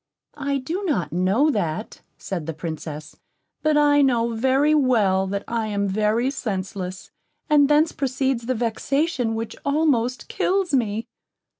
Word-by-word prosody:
"I 280 -1 0
do 325 +10 -4
not 175 - -1
know 195 - +2
that," 200 - -3 0.2
said 175 -5 -5
the 165 - -4
Princess; 155 -2 -6 0.5
"but 310 -1 +2
I 290 -1 +5
know, 240 -4 +2
very 265 +6 +2
well, 215 -10 +3
that 200 +1 -3
I 230 -2 -1
am 200 -1 -1
very 215 +6 +1
senseless, 190 -6 -5 0.4
and 290 -1 +5
thence 300 +2 +4
proceeds 260 -3 -1
the 255 - 0
vexation 245 +2 -1
which 225 0 -4
almost 280 -5 +1
kills 375 -4 0
me." 225 -3 0
235 Hz, 140 wpm, -23 LUFS, 200-280 Hz, 0.5 s, I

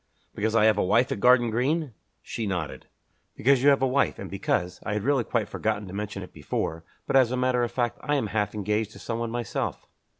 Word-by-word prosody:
"Because 110 +2 -1
I 110 -1 +5
have 110 -2 +4
a - - +3
wife 120 +7 +3
at - - -2
Garden 120 0 +5
Green?" 135 +4 0 0.3
She 115 -2 -4
nodded. 90 -6 -4 0.5
"Because 135 +1 +4
you 140 - +6
have 140 -1 +3
a - - +4
wife, 135 +2 +1
and - - -7
because 90 0 -1
I 110 - -2
had 105 -1 -2
really 135 -2 +2
quite 115 -1 -1
forgotten 105 -2 -2
to 90 - -9
mention 100 -1 -4
it 90 - -12
before, 80 +2 -3 0.2
but - - -1
as 130 -3 +6
a 130 - -1
matter 125 -1 +2
of 120 - -1
fact 120 -2 -1
I 145 - 0
am 135 - 0
half 105 -1 0
engaged 105 +1 -1
to - - -12
someone 115 0 -3
myself." 120 -2 -3
115 Hz, 230 wpm, -26 LUFS, 105-125 Hz, 0.5 s, you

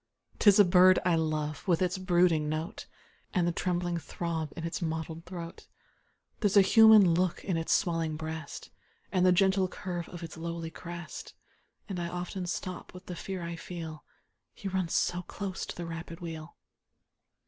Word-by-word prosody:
'Tis 205 -2 +6
a 205 - +8
bird 180 +1 +6
I 180 - +4
love, 155 0 -2
with 175 -3 +3
its 185 +1 0
brooding 175 -4 +3
note, 155 +2 -4 0.5
And 175 -2 +3
the - - +2
trembling 175 0 -1
throb 160 -1 -4
in 165 - -5
its 165 +4 -3
mottled 160 0 -4
throat; 170 -2 -8 0.7
There's 205 -2 +2
a 200 - +9
human 215 -3 +7
look 180 +1 0
in 185 - 0
its 165 0 -1
swellinor 165 -4 +1
breast, 160 -2 -6 0.4
And 185 0 +3
the - - +6
gentle 190 +1 +3
curve 175 -2 -5
of 175 -1 -8
its 165 -2 -8
lowly 165 0 -4
crest; 170 0 -8 0.5
And 190 -3 -4
I 170 - -2
often 180 +1 -4
stop 185 +1 -5
with 180 - -11
the 180 - -6
fear 185 0 -5
I 170 0 -4
feel 165 -3 -7 0.3
— - - -52
He 200 - -6
runs 185 -3 -1
so 175 0 +1
close 190 +1 -5
to - - -6
the 175 - -5
rapid 165 0 -7
wheel. 165 -2 -7
175 Hz, 175 wpm, -30 LUFS, 165-185 Hz, 0.7 s, a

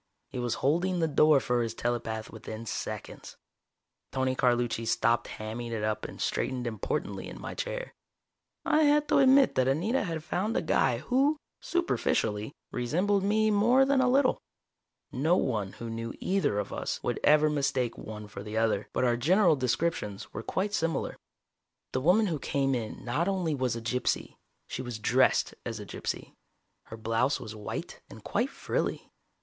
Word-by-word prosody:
He 125 - -5
was 120 -1 -1
holding 175 +6 +2
the 165 - +2
door 150 -1 +5
for 125 -2 0
his 115 -1 -2
telepath 115 -2 -2
within 110 0 -7
seconds. - - -6 0.7
Tony 130 -1 0
Carlucci 120 -2 +1
stopped 115 +2 +2
hamming 110 +2 -5
it 110 -2 -2
up 110 0 -1
and - - -8
straightened 125 -1 -1
importantly 110 -4 -3
in - - -9
my - - -6
chair. - - -4 0.7
I 305 - +4
had 295 0 +4
to - - +5
admit 270 0 +6
that 130 0 +2
Anita 175 - +1
had 165 -5 -4
found 195 +7 -1
a - - 0
guy - - +2
who, 275 +4 +2 0.2
superficially, 110 - 0 0.2
resembled 180 +12 +1
me 215 +2 +2
more 240 +6 +5
than 275 -1 +3
a 255 - +3
little. 265 0 +3 0.7
No 155 +6 +2
one 105 -7 -1
who 115 - -7
knew 115 0 -5
either 190 - +1
of 105 - -3
us - - -3
would - - -1
ever 150 +1 +6
mistake 135 -5 0
one 105 -1 -8
for 100 -1 -8
the 105 +2 -5
other, 110 -2 +1
but - - 0
our 120 -1 +3
general 170 - +4
descriptions 130 -5 -2
were - - -4
quite 195 - -2
similar. 165 -4 -1 0.8
The 130 - -1
woman 185 +9 +4
who 165 -7 -1
came 135 0 0
in 115 -2 -4
not 145 +9 0
only 185 -5 0
was 130 -4 0
a 115 - -5
gypsy, 125 +2 -1 0.3
she - - -5
was 120 -3 -5
dressed 110 - +3
as - - -4
a - - -7
gypsy. - - -5 0.5
Her 110 - -9
blouse 115 +5 +1
was 110 -1 -8
white, 105 -1 -6
and - - -12
quite - - 0
frilly. - - -3
130 Hz, 170 wpm, -29 LUFS, 115-190 Hz, 0.8 s, admit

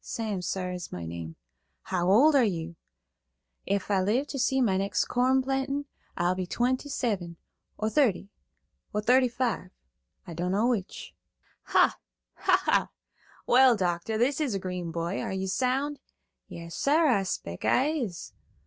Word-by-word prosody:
"Sam, 215 -5 -3
sar, 180 0 -3
is 180 -1 -6
my 85 -2 -6
name." 80 -1 -7 0.5
"How 180 -1 -1
old 270 +11 +6
are 270 - +6
you?" 170 -5 -2 0.9
"Ef 200 +1 -1
I 195 -2 +3
live 225 +9 +1
ter 275 - -4
see 265 +1 +2
next 195 -5 +1
corn 260 +2 +2
plantin' 270 +2 -1 0.3
I'll 175 +1 +2
be 185 -1 -4
twenty 255 +7 -1
seven, 195 -11 -2 0.4
or 215 - -1
thirty, 215 -8 +1 0.6
or 210 - 0
thirty 255 +3 +5
five, 245 -2 -2 0.6
I 170 - -8
dunno 180 +6 0
which." 230 -7 -2 0.5
"Ha, - - +3 0.3
ha - - +2
ha! - - +2 0.6
Well, 255 -1 +6
doctor, 180 +3 -1
this 265 +6 +1
is 265 -9 0
a - - -1
green 180 -2 -4
boy. 170 +3 -3
Are - - -3
you 190 0 -2
sound?" 265 +8 -1 0.5
"Yas, 170 0 -9
sar; 310 +4 +3
I 240 -9 +3
spec' 90 - -5
I 265 +4 +3
is." 245 - -4
210 Hz, 155 wpm, -28 LUFS, 180-260 Hz, 0.9 s, old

